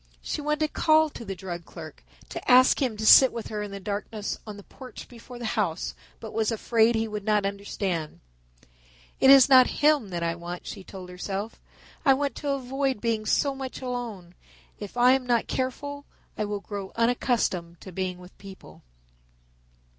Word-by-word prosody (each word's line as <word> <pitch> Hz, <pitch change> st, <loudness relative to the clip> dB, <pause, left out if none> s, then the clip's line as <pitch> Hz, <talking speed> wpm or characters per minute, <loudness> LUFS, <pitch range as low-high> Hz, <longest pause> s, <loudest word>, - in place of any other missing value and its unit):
She -, -, -3 dB
wanted 300 Hz, +1 st, -1 dB
to 310 Hz, -, +3 dB
call 315 Hz, 0 st, +3 dB
to 235 Hz, -, -9 dB
the 195 Hz, -3 st, -5 dB
drug 175 Hz, -2 st, -6 dB
clerk, -, -, -11 dB, 0.3 s
to -, -, -6 dB
ask 255 Hz, +3 st, +6 dB
him 245 Hz, -6 st, 0 dB
to 220 Hz, -, -3 dB
sit 260 Hz, +4 st, +8 dB
with 230 Hz, -2 st, -6 dB
her 210 Hz, -1 st, -4 dB
in 210 Hz, -, -5 dB
the 200 Hz, 0 st, -7 dB
darkness 205 Hz, +1 st, -4 dB
on 210 Hz, -1 st, -7 dB
the 200 Hz, -, -11 dB
porch 255 Hz, +4 st, -11 dB
before 245 Hz, +1 st, -12 dB
the 240 Hz, -, -6 dB
house, 190 Hz, -8 st, -1 dB, 0.3 s
but 220 Hz, -, -9 dB
was 220 Hz, 0 st, 0 dB
afraid 225 Hz, +1 st, +2 dB
he 225 Hz, 0 st, 0 dB
would 210 Hz, -1 st, -5 dB
not 210 Hz, -1 st, +1 dB
understand. 195 Hz, -5 st, -3 dB, 1.0 s
"It 265 Hz, -, +5 dB
is 270 Hz, -2 st, +9 dB
not 260 Hz, -2 st, +7 dB, 0.2 s
him 295 Hz, -8 st, +4 dB
that 170 Hz, -2 st, -3 dB
I 165 Hz, 0 st, 0 dB
want," 175 Hz, +1 st, -7 dB
she 195 Hz, -, -7 dB
told 185 Hz, -1 st, -10 dB
herself; 195 Hz, +4 st, -5 dB, 0.4 s
"I 270 Hz, -3 st, +5 dB
want 285 Hz, 0 st, -1 dB
to 290 Hz, -, -4 dB
avoid 270 Hz, -2 st, -1 dB
being 220 Hz, -1 st, -1 dB
so 280 Hz, -1 st, +2 dB
much 265 Hz, -1 st, -6 dB
alone. 235 Hz, -9 st, -5 dB, 0.5 s
If 205 Hz, +3 st, -8 dB
I 245 Hz, +1 st, +6 dB
am 260 Hz, -1 st, +1 dB
not 240 Hz, -2 st, +2 dB
careful 285 Hz, +2 st, -4 dB, 0.3 s
I 215 Hz, -, -2 dB
will 205 Hz, -1 st, -4 dB
grow 200 Hz, -2 st, -6 dB
unaccustomed 230 Hz, -8 st, 0 dB
to 190 Hz, -, -10 dB
being 185 Hz, 0 st, -3 dB
with 180 Hz, 0 st, -15 dB
people." 195 Hz, -1 st, -13 dB
220 Hz, 185 wpm, -26 LUFS, 195-255 Hz, 1.0 s, is